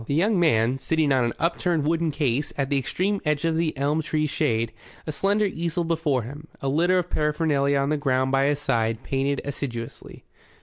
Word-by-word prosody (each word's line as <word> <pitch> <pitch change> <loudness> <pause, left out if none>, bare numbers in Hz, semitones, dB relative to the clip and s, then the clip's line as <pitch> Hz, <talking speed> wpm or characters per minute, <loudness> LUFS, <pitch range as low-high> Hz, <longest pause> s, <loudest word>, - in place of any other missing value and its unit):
The 140 - 0
young 195 +4 +2
man, 125 -5 +2
sitting 160 0 +1
on 130 -2 +3
an 120 - -1
upturned 170 -2 0
wooden 165 +1 +1
case, 145 -2 -1
at 140 0 -1
the 140 - +3
extreme 190 +9 -1
edge 150 0 0
of 165 -1 +1
the 160 -3 -1
elm 145 +3 +1
tree's 155 -1 -1
shade, 115 0 0 0.3
a 155 - -3
slender 200 +6 +1
easel 170 -2 -2
before 160 -6 0
him, 145 +6 -9
a 135 - -2
litter 175 +6 +3
of 180 -1 -2
paraphernalia 150 -2 +1
on 140 0 +1
the 150 - +1
ground 130 -2 +1
by 135 0 +3
his 145 0 +2
side, 115 -6 -1
painted 135 +1 -1
assiduously. 125 -5 -6
145 Hz, 200 wpm, -24 LUFS, 135-165 Hz, 0.3 s, on